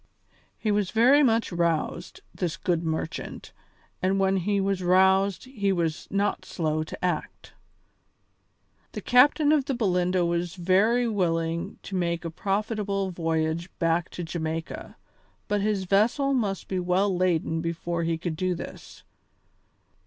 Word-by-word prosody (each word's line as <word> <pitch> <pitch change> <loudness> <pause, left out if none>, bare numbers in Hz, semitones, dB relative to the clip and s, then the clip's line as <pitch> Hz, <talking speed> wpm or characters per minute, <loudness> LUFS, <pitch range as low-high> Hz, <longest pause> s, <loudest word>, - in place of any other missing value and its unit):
He 215 - -1
was 205 -2 +1
very 245 +8 +5
much 230 -6 +2
roused, 170 0 -1
this 175 -4 -3
good 170 -2 0
merchant, 160 0 -4 0.5
and 190 +1 +1
when 195 0 +2
he 200 +2 0
was 195 -1 0
roused 190 +3 +3
he 210 -7 -1
was 165 -4 -1
not 200 +1 0
slow 155 -2 -2
to 155 - -5
act. 175 -4 -4 1.4
The - - -5
captain 290 +4 +5
of 295 -4 +3
the 275 - -1
Belinda 180 -5 +1
was 170 +1 -1
very 200 +7 +3
willing 170 -5 -1
to 195 - -6
make 170 -1 -1
a 165 - -3
profitable 200 +1 -1
voyage 165 0 -1
back 165 0 +1
to 175 - -3
Jamaica, 160 -1 -5 0.5
but 205 -1 0
his 205 -2 0
vessel 225 +9 +2
must 205 -7 -1
be 190 - -2
well 185 +2 +1
laden 165 -3 0
before 170 0 -3
he 165 0 0
could 165 -1 -4
do 185 +2 -1
this. - - -10
185 Hz, 140 wpm, -26 LUFS, 170-205 Hz, 1.4 s, very